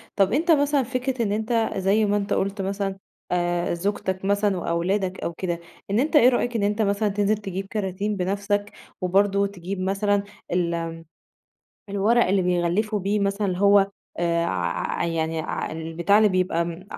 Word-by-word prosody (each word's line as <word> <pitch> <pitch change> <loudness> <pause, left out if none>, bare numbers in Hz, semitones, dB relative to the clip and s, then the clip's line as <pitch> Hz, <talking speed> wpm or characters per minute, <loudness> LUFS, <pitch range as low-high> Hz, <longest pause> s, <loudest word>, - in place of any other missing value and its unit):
طَب 195 +1 +3
أنت 330 +5 +2
مثلًا 285 -2 +3
فكرة 255 0 -2
إن 200 - -1
أنت 220 +1 0
زي 195 +3 +2
ما 205 0 +2
أنت 200 -1 -1
قُلت 195 +1 -1
مثلًا 195 0 -2 0.3
آآ، 175 -1 0
زوجتك 190 +1 -2
مثلًا 200 -1 +2
وأولادك 180 +3 -1
أو 170 - -3
كده، 175 -1 -3 0.3
إن 205 - +2
أنت 305 +5 0
إيه 250 -3 +8
رأيك 245 -1 0
إن 215 - +1
أنت 210 +2 +1
مثلًا 205 +1 +1
تنزِل 205 +1 +1
تجيب 195 -2 -5
كَراتين 205 0 -2
بنفسك 200 +2 -1 0.3
وبرضه 200 +2 +2
تجيب 195 0 -6
مثلًا 200 +2 +1 0.3
ال 170 -2 -1 0.9
الورق 210 +4 +3
اللي 190 0 +2
بيغلِّفوا 180 +5 +1
بيه 200 +2 0
مثلًا 200 -2 0
هو 200 0 +5 0.3
آآ 170 0 +1
ع 85 - -2
يعني 165 -1 -1
ع 155 - -4
البتاع 165 +5 +1
اللي 215 -1 +5
بيبقى 180 -2 -1
200 Hz, 160 wpm, -24 LUFS, 180-210 Hz, 0.9 s, إيه